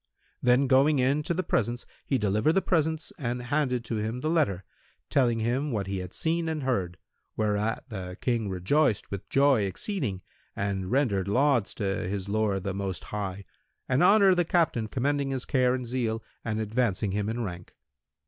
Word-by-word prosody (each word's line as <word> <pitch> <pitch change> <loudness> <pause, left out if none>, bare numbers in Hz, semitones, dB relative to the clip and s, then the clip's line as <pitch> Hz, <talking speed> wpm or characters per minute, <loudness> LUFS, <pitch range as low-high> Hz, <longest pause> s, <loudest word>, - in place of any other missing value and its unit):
Then 125 +2 +4
going 135 +3 +4
in 135 +3 +2
to 160 - -1
the 185 - -1
presence, 120 - -1 0.2
he 135 - +2
delivered 110 +7 +2
the 195 - +3
presents 160 -2 0
and 125 -3 -2
handed 125 -1 -1
to 110 0 -2
him 110 +4 -3
the 155 - 0
letter, 100 - +1 0.5
telling 120 -4 +3
him 125 +6 0
what 105 -4 -1
he 95 0 -3
had 90 -1 -6
seen 165 0 -1
and 155 -3 -3
heard, 95 -9 -1 0.4
whereat 105 +1 0
the 90 -4 -6
King 115 -5 0
rejoiced 105 - +1
with 100 0 -6
joy 135 -4 +4
exceeding 100 - -3 0.3
and 95 -2 -2
rendered 115 -8 +1
lauds 125 0 +2
to - - -4 0.2
his 100 0 -3
Lord 100 -2 0
the 100 -1 -2
Most 95 -2 -4
High 100 -2 -5 0.4
and 130 +2 +2
honoured 195 0 +6
the 175 - +4
Captain 160 -10 +1
commending 140 +4 0
his 130 -2 -2
care 125 -1 +2
and 125 -1 -4
zeal 115 -2 -1 0.2
and 110 -1 -2
advancing 110 -2 0
him 105 +1 -1
in 120 +1 -2
rank. 90 -3 -7
120 Hz, 175 wpm, -27 LUFS, 100-140 Hz, 0.5 s, honoured